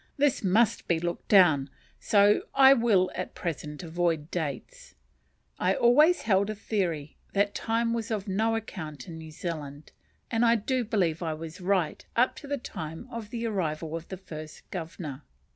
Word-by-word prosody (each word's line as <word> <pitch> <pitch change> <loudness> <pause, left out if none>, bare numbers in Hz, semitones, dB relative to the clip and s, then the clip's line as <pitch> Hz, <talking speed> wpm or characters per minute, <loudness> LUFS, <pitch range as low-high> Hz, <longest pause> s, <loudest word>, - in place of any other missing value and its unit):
This 285 -4 +2
must 205 +4 +2
be 170 -2 +2
looked 175 +1 -4
down, 155 -9 +5 0.3
so 205 0 +4
I 270 0 +8
will 220 -7 +3
at 185 - -5
present 150 -2 -5
avoid 165 -2 -1
dates. 180 - -5 0.6
I - - +2
always 300 +9 +5
held 200 -1 +2
a 215 - -3
theory 175 -9 -2 0.2
that 200 0 +2
time 230 +1 0
was 230 -2 -3
of 210 -2 -2
no 220 +4 +1
account 155 - -6
in 165 -1 -8
New 160 0 -9
Zealand, 155 -3 -6 0.4
and 230 0 +2
I 235 0 +5
do 250 +3 0
believe 185 -8 0
I 160 -2 -2
was 165 +4 -8
right 180 -4 0
up 245 +2 +3
to 285 - -9
the 285 0 -1
time 165 - -7
of 230 -3 -6
the 235 0 -4
arrival 165 -7 -2
of 165 0 -6
the 190 - -6
first 155 -4 -10
Governor. 160 -5 -6
190 Hz, 170 wpm, -28 LUFS, 160-225 Hz, 0.6 s, I